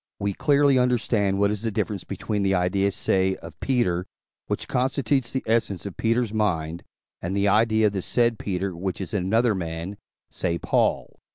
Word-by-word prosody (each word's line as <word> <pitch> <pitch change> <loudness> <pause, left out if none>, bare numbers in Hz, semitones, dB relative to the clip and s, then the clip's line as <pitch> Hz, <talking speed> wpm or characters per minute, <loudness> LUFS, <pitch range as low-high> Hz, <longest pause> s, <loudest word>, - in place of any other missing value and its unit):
we 100 0 -1
clearly 140 +2 +3
understand 115 -5 +1
what 100 +1 +3
is 105 -1 -3
the 115 - -1
difference 100 -1 -2
between 105 -2 -3
the 95 -1 +2
idea, 95 +2 +1
say, 95 0 +1
of - - -12
Peter, 95 -9 0 0.4
which - - -3
constitutes 130 -1 0
the 130 - -2
essence 110 -5 0
of 100 - -6
Peter's 115 -1 0
mind, 85 -6 -1 0.4
and 90 +3 -2
the 100 +1 +2
idea 110 +1 +3
of 105 - +2
the 95 - -2
said 120 +2 +1
Peter, 95 -1 -2
which 95 +1 -3
is 95 - -5
in 100 -4 0
another 115 +3 +3
man, 85 +1 -4 0.4
say, 85 -2 -1
Paul. - - 0
100 Hz, 180 wpm, -25 LUFS, 95-115 Hz, 0.4 s, clearly